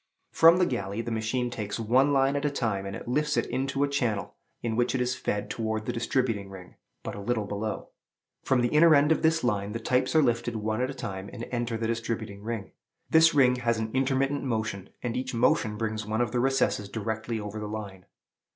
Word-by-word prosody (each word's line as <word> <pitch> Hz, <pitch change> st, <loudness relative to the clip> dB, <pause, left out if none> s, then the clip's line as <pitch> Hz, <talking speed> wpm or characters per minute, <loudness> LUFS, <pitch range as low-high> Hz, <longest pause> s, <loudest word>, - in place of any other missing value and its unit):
From 165 Hz, +2 st, +7 dB
the 180 Hz, -, +4 dB
galley, 110 Hz, -, -3 dB
the 120 Hz, -, -4 dB
machine 115 Hz, +3 st, -1 dB
takes 105 Hz, -2 st, -4 dB
one 130 Hz, +6 st, +3 dB
line 135 Hz, 0 st, +3 dB
at 145 Hz, -, -1 dB
a 145 Hz, -, +2 dB
time, 110 Hz, -8 st, -2 dB
and 95 Hz, -, -6 dB
lifts 150 Hz, +4 st, 0 dB
it -, -, +2 dB
into 135 Hz, +1 st, -1 dB
a -, -, +2 dB
channel, 120 Hz, -8 st, -1 dB, 0.3 s
in 115 Hz, -2 st, -1 dB
which 120 Hz, +2 st, +1 dB
it -, -, 0 dB
is 125 Hz, +1 st, +1 dB
fed 105 Hz, -5 st, -2 dB
towards 110 Hz, -1 st, -3 dB
the 120 Hz, -, -2 dB
distributing 115 Hz, -4 st, -1 dB
ring, 95 Hz, -2 st, -11 dB, 0.3 s
but -, -, -5 dB
a 100 Hz, -, -7 dB
little 110 Hz, 0 st, -1 dB
below. 105 Hz, +2 st, -4 dB, 0.5 s
From 130 Hz, -2 st, +2 dB
the 120 Hz, -, +2 dB
inner 155 Hz, +2 st, +6 dB
end 145 Hz, +2 st, +4 dB
of 160 Hz, -, +3 dB
this 160 Hz, 0 st, +2 dB
line 105 Hz, -3 st, 0 dB
the 115 Hz, -, -3 dB
types 130 Hz, +3 st, 0 dB
are 155 Hz, -, +6 dB
lifted 120 Hz, -1 st, 0 dB
one 110 Hz, +1 st, -1 dB
at 130 Hz, -, 0 dB
a 135 Hz, -, -6 dB
time, 95 Hz, -5 st, -6 dB
and 120 Hz, -1 st, -6 dB
enter 120 Hz, -2 st, -1 dB
the 115 Hz, -, -2 dB
distributing 110 Hz, -3 st, -3 dB
ring. 110 Hz, -2 st, -5 dB, 0.4 s
This 160 Hz, 0 st, +6 dB
ring 125 Hz, -3 st, +5 dB
has 115 Hz, -2 st, 0 dB
an 110 Hz, 0 st, -3 dB
intermittent 135 Hz, +1 st, +1 dB
motion, 110 Hz, -6 st, -3 dB
and 120 Hz, -2 st, -2 dB
each 130 Hz, -1 st, -3 dB
motion 110 Hz, -2 st, +2 dB
brings 110 Hz, 0 st, -2 dB
one 110 Hz, +2 st, -2 dB
of 120 Hz, -2 st, +1 dB
the 125 Hz, -, 0 dB
recesses 105 Hz, -6 st, +1 dB
directly 110 Hz, +1 st, -3 dB
over 105 Hz, +1 st, -6 dB
the 105 Hz, -, -4 dB
line. 100 Hz, -4 st, -7 dB
115 Hz, 220 wpm, -27 LUFS, 110-130 Hz, 0.5 s, From